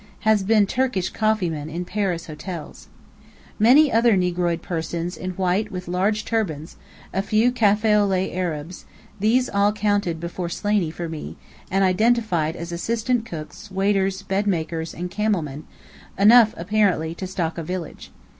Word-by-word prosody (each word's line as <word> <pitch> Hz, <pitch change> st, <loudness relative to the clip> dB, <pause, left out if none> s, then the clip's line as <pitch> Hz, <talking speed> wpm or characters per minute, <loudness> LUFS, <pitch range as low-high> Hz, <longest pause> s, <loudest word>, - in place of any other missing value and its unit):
(Has 215 Hz, -2 st, +3 dB
been 210 Hz, +1 st, +3 dB
Turkish 210 Hz, -5 st, -1 dB
coffee 215 Hz, -4 st, +1 dB
man 155 Hz, -2 st, -4 dB
in 170 Hz, +3 st, -4 dB
Paris 185 Hz, -4 st, -2 dB
hotels.) 155 Hz, 0 st, -8 dB, 0.7 s
Many 270 Hz, +7 st, +6 dB
other 230 Hz, -2 st, +4 dB
negroid 175 Hz, -2 st, 0 dB
persons 170 Hz, +1 st, -3 dB
in 185 Hz, -, -5 dB
white 190 Hz, +3 st, 0 dB
with 180 Hz, -2 st, -6 dB
large 195 Hz, +4 st, 0 dB
turbans; 165 Hz, -9 st, -2 dB, 0.4 s
a 195 Hz, -, +1 dB
few 220 Hz, +4 st, +2 dB
café 215 Hz, -2 st, +3 dB
au 205 Hz, -, +2 dB
lait 190 Hz, -1 st, -1 dB
Arabs; 175 Hz, -1 st, -4 dB, 0.3 s
these 240 Hz, +5 st, +2 dB
all 200 Hz, +1 st, +2 dB
counted 205 Hz, -5 st, 0 dB
beforehand 170 Hz, +1 st, -4 dB
by -, -, -6 dB
Slaney, 205 Hz, -5 st, +1 dB
for 170 Hz, +1 st, -5 dB
me, 160 Hz, -2 st, -7 dB, 0.3 s
and 195 Hz, +1 st, +2 dB
identified 185 Hz, -5 st, +2 dB
as 170 Hz, 0 st, -6 dB
assistant 225 Hz, +6 st, -1 dB
cooks, 165 Hz, +6 st, -8 dB
waiters, 195 Hz, 0 st, 0 dB
bed 195 Hz, +1 st, -1 dB
makers, 165 Hz, -3 st, -2 dB
and 180 Hz, +1 st, -5 dB
camel 210 Hz, -4 st, 0 dB
men, 150 Hz, +1 st, -8 dB, 0.5 s
enough 220 Hz, +3 st, +6 dB
apparently 180 Hz, -3 st, +1 dB
to 185 Hz, +2 st, -6 dB
stock 170 Hz, -3 st, -3 dB
a -, -, -4 dB
village. 180 Hz, 0 st, -6 dB
190 Hz, 155 wpm, -23 LUFS, 170-215 Hz, 0.7 s, Many